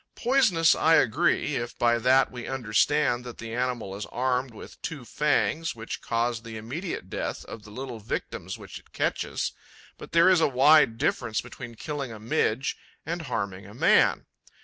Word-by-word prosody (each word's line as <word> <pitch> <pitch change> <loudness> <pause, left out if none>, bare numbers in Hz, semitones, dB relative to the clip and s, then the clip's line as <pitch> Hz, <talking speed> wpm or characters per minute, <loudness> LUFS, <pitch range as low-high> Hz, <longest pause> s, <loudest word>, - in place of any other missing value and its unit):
Poisonous, 210 -11 +4
I 160 +1 +4
agree, 150 +2 +2
if 120 0 -5
by 120 -1 +3
that 130 +3 +4
we 120 -1 -7
understand 130 +2 +1
that 120 -1 -9
the 115 0 -7
animal 120 -5 -2
is 100 - -6
armed 125 0 -1
with 110 - -12
two 145 -6 -5
fangs 150 +4 0
which 115 0 -6
cause 115 0 -1
the 115 -1 -8
immediate 130 - -5
death - - -4
of 115 - -9
the 105 - -14
little 125 +1 -6
victims 105 - -5
which - - -10
it - - -26
catches; - - -1 0.5
but - - -10
there 170 +2 +5
is 185 -3 +5
a - - +5
wide 135 -2 +5
difference 115 -2 0
between 120 -1 -8
killing 140 0 -5
a 110 - -9
Midge 115 +3 0 0.3
and 170 +3 -3
harming 100 -5 -3
a 105 - -13
man. - - +4
125 Hz, 170 wpm, -27 LUFS, 115-150 Hz, 0.5 s, there